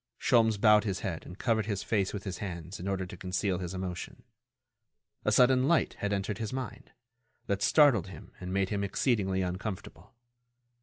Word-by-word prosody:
Sholmes 110 Hz, -3 st, +3 dB
bowed 105 Hz, -1 st, +6 dB
his 95 Hz, -3 st, -2 dB
head 85 Hz, -4 st, -4 dB
and 90 Hz, -, -10 dB
covered 110 Hz, -2 st, 0 dB
his 100 Hz, -3 st, -2 dB
face 100 Hz, -4 st, 0 dB
with 100 Hz, -2 st, -5 dB
his 95 Hz, -2 st, -5 dB
hands 90 Hz, -3 st, -6 dB
in 90 Hz, -, -5 dB
order 95 Hz, -1 st, -1 dB
to 90 Hz, -, -9 dB
conceal 90 Hz, 0 st, -1 dB
his 90 Hz, 0 st, -5 dB
emotion. 90 Hz, -2 st, -6 dB, 1.0 s
A -, -, +3 dB
sudden 130 Hz, +1 st, +5 dB
light 170 Hz, -1 st, +2 dB
had 100 Hz, -, -1 dB
entered 100 Hz, +1 st, -2 dB
his 110 Hz, -2 st, -3 dB
mind, 130 Hz, -1 st, -6 dB, 0.5 s
that 100 Hz, 0 st, -1 dB
startled 130 Hz, -, +5 dB
him 90 Hz, -5 st, -11 dB
and 90 Hz, 0 st, -6 dB
made 95 Hz, 0 st, +1 dB
him 100 Hz, -1 st, -1 dB
exceedingly 95 Hz, -3 st, 0 dB
uncomfortable. 95 Hz, +5 st, -6 dB
100 Hz, 175 wpm, -30 LUFS, 95-110 Hz, 1.0 s, bowed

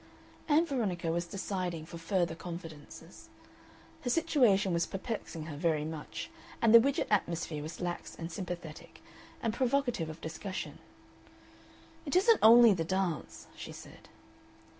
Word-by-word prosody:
Ann 310 Hz, +3 st, +5 dB
Veronica 195 Hz, -, -1 dB
was 170 Hz, +1 st, -1 dB
deciding 180 Hz, -4 st, -3 dB
for 170 Hz, 0 st, -9 dB
further 170 Hz, 0 st, 0 dB
confidences. 165 Hz, -3 st, -10 dB, 0.7 s
Her 245 Hz, -, -3 dB
situation 240 Hz, -, +3 dB
was 170 Hz, 0 st, +1 dB
perplexing 195 Hz, -5 st, -5 dB
her 155 Hz, -2 st, -6 dB
very 155 Hz, -1 st, 0 dB
much, 155 Hz, -1 st, -6 dB, 0.3 s
and 230 Hz, -1 st, +4 dB
the 230 Hz, -, +12 dB
Widgett 275 Hz, +4 st, +1 dB
atmosphere 170 Hz, -6 st, 0 dB
was 155 Hz, +3 st, -7 dB
lax 175 Hz, -1 st, -4 dB
and 165 Hz, 0 st, -6 dB
sympathetic, 170 Hz, -3 st, -7 dB, 0.4 s
and 225 Hz, -2 st, 0 dB
provocative 245 Hz, -, 0 dB
of 160 Hz, +1 st, -8 dB
discussion. 175 Hz, +4 st, -6 dB, 1.3 s
"It 285 Hz, -, -1 dB
isn't 430 Hz, +4 st, +5 dB
only 230 Hz, 0 st, +9 dB
the 170 Hz, -3 st, -1 dB
dance," 185 Hz, -2 st, -2 dB
she -, -, -8 dB
said. -, -, -13 dB
180 Hz, 135 wpm, -31 LUFS, 165-230 Hz, 1.3 s, the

